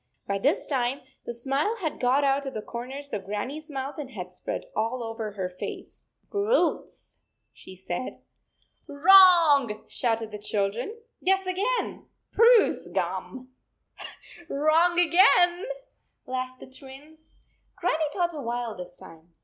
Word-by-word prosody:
By 200 0 -2
this 280 +10 +1
time, 260 -1 -1 0.3
the 235 - -3
smile 275 - -1
had 320 -8 -4
got 260 +3 +2
out 275 0 +1
of 270 - -6
the 215 - -3
corners 265 +4 -6
of 200 - -3
Grannie 210 +9 -4
s 310 0 -18
mouth 275 +1 -5
and 280 -3 -6
had 180 -7 -8
spread 180 - -5
all 230 +3 -1
over 225 -2 -5
her 190 -3 -3
face. 180 0 -8
" - - -43
Roots," 415 +4 -1 0.3
she 190 - -13
said. 185 +6 -5 0.4
" - - -43
Wrong," 315 - +6
shouted 225 -3 -1
the 210 - -7
children. 210 - -2
" - - -32
Guess 385 +1 +2
again." 400 +7 -2 0.2
"Spruce 465 0 +4
gum." 255 -1 -4 0.5
" 345 -1 -13
Wrong 325 +5 +3
again," 355 +2 +5 0.6
laughed 255 0 -4
the - - -9
Twins. 280 +4 -14 0.4
Grannie 345 -3 0
thought 345 -1 -1
a 300 - -6
while 235 -2 -3
this 180 -1 -9
time. 165 +1 -16
270 Hz, 150 wpm, -26 LUFS, 225-340 Hz, 0.6 s, Wrong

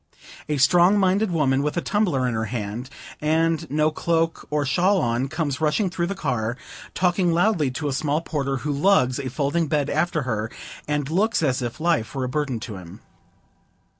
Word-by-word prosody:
A 150 - 0
strong 175 +8 +5
minded 195 +2 +2
woman, 140 -6 +1
with 150 +3 -2
a - - +4
tumbler 175 -13 +1
in 125 - -1
her 110 0 -1
hand, 115 +2 -5 0.3
and 160 0 +1
no 155 +2 +2
cloak 165 +1 -1
or 150 -1 0
shawl 185 +8 +2
on, 120 0 0
comes 150 -1 -3
rushing 165 +5 +1
through 170 0 -1
the 200 - -3
car, 125 - -2 0.4
talking 180 -1 +2
loudly 170 -4 +2
to 145 +4 -4
a 140 - -1
small 145 +2 0
porter, 140 -4 -2
who 150 - 0
lugs 140 -4 +3
a 135 -2 -3
folding 145 +5 0
bed 145 -1 0
after 155 0 0
her, 110 -3 -2 0.4
and 150 -1 -1
looks 205 +2 +1
as 130 -3 +1
if 120 +3 -4
life 160 -7 0
were 135 - -1
a 125 - -2
burden 135 -3 -2
to 105 -5 -6
him. 90 -2 -11
150 Hz, 190 wpm, -23 LUFS, 130-170 Hz, 0.4 s, strong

